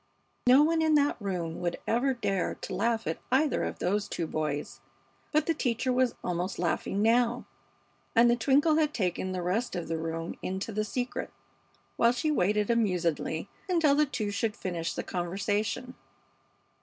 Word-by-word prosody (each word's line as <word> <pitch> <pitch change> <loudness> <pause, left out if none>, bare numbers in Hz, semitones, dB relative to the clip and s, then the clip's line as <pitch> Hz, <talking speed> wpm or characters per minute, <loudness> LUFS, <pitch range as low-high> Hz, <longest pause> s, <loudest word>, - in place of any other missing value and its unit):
No 260 +4 +8
one 325 +1 +2
in 315 -1 +3
that 290 0 +3
room 175 -5 -3
would 175 -1 -1
ever 255 +3 +1
dare 195 -6 -1
to - - -7
laugh 230 -1 0
at 160 - -2
either 275 +3 +2
of - - -3
those 200 +3 0
two 170 - -3
boys. 150 -2 -3 0.5
But 305 -1 +2
the 330 - +2
teacher 255 -3 0
was 250 -1 +2
almost 180 +2 -2
laughing 180 +3 0
now, 235 +1 +2 0.7
and 230 +1 +7
the 240 - +4
twinkle 285 +6 +3
had 310 -1 +1
taken 185 -2 -1
the 180 -1 -3
rest 210 +8 -1
of 175 -2 -3
the 165 0 -2
room 165 +1 -4
into 190 +4 -3
the 215 0 -1
secret, 245 +3 -3 0.7
while 235 +1 +4
she 305 +5 0
waited 210 -3 +2
amusedly 180 -6 0 0.2
until 325 -5 +4
the 300 +1 +3
two 235 -6 -2
should 215 +1 -1
finish 170 -3 -3
the - - -3
conversation. 205 +7 -2
220 Hz, 170 wpm, -29 LUFS, 180-255 Hz, 0.7 s, No